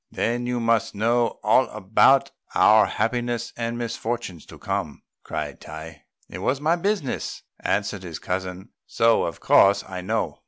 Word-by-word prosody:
"Then 120 +1 -1
you 125 0 -1
must 115 -1 +1
know 115 +3 +1
all 115 +5 +4
about 110 +7 +3 0.2
our 110 0 +6
happiness 120 0 -2
and 115 0 -3
misfortunes 115 -6 -4
to - - -12
come," - - -4 0.2
cried - - -5
Tai. 80 0 -10 0.2
"It 90 - -8
is 130 +7 0
my 155 +3 +2
business," 190 -5 -2 0.2
answered 100 -1 -1
his 85 -4 -7
cousin, 95 +2 -4 0.2
"so 115 0 +3
of 85 - -5
course 100 +1 +5
I 95 -1 -6
know. 110 +4 -2
115 Hz, 150 wpm, -24 LUFS, 95-120 Hz, 0.2 s, our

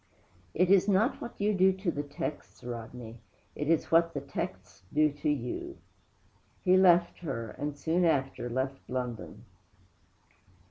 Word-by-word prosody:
'It 180 +2 +3
is 195 0 +5
not 210 +6 +2
what 235 - -8
you 210 +1 +2
do 190 0 +5
to 190 -1 -2
the 145 - -3
texts, 145 -1 -6
Rodney; 120 -1 -7 0.4
it 150 - -3
is 165 -2 +2
what 165 0 +4
the - - 0
texts 140 - -6
do 150 0 +3
to 145 +1 -2
you!' 150 - -3 0.9
He 185 -1 +5
left 175 -2 +5
her, 115 -10 -4
and, 145 0 -5
soon 165 +5 +1
after, 135 -6 +1
left 130 +2 -2
London. 125 -2 -5
150 Hz, 145 wpm, -30 LUFS, 130-180 Hz, 0.9 s, is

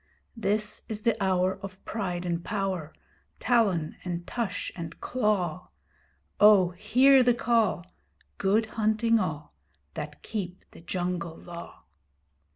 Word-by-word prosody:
This 210 -1 0
is 215 -1 -4
the 230 -2 +3
hour 185 0 +1
of 195 -1 -9
pride 180 -5 -3
and 170 -1 -2
power, 190 -6 -2 0.5
Talon 200 -10 +1
and 175 -1 -4
tush 235 -4 -3
and 165 -2 -7
claw. 190 -8 -1 0.7
Oh 205 -4 +7
hear 260 +9 +5
the 245 -1 +4
call! 225 -7 +1 0.5
Good 205 +3 +3
hunting 220 +1 +2
all 155 -6 -4 0.4
That 150 0 -7
keep 185 -4 -5
the - - -14
Jungle 175 -1 -3
Law! 170 -1 -10
190 Hz, 120 wpm, -28 LUFS, 175-220 Hz, 0.7 s, Oh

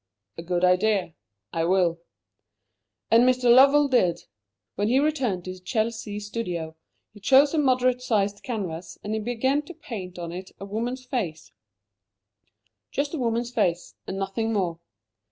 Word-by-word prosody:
'" - - -48
"A - - -3
good 175 +1 -2
idea. 185 -1 +2 0.4
I 165 - 0
will." 175 -2 +2 1.1
And 230 +2 +7
Mr. 250 -1 +4
Lovell 280 +3 +6
did. 190 -11 +2 0.5
When 205 +2 -1
he 250 +4 +3
returned 265 - 0
to 185 - -5
his 185 0 -11
Chelsea 220 0 -2
studio, 180 -7 -4 0.4
he 210 - -14
chose 275 +8 +5
a 320 - +2
moderate 255 -2 +2
sized 205 -4 0
canvas, 185 -8 -5
and 210 - -3
he 220 - 0
began 245 +6 0
to 325 +4 -12
paint 195 - -7
on 170 -1 -5
it 185 +2 -8
a 195 - -6
woman's 240 +5 -4
face 205 - -4 1.4
just 285 +2 -2
a 320 - -2
woman's 235 0 -1
face, 180 -8 0
and 190 - -4
nothing 195 +4 -2
more. 180 -6 -1
215 Hz, 155 wpm, -25 LUFS, 185-250 Hz, 1.4 s, And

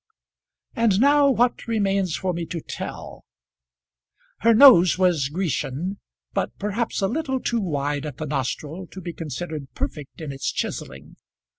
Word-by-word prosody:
And 225 -4 +3
now 285 +2 +5
what 245 -2 +1
remains 195 -5 +1
for 185 -2 -1
me 170 -1 -4
to 170 - -4
tell? - - -7 1.2
Her 230 0 +4
nose 215 - +8
was 175 -8 +2
Grecian, 175 +1 -2 0.3
but - - -2
perhaps 210 +3 -2
a - - +3
little 265 +2 -1
too 235 -1 -1
wide 145 -4 -2
at 145 - -8
the 155 - -4
nostril 150 +5 -3
to 190 - -10
be 175 -2 -6
considered 155 -1 -5
perfect 145 -3 -5
in 155 -3 -5
its 135 0 -2
chiselling. 65 +1 -5
180 Hz, 145 wpm, -23 LUFS, 150-220 Hz, 1.2 s, nose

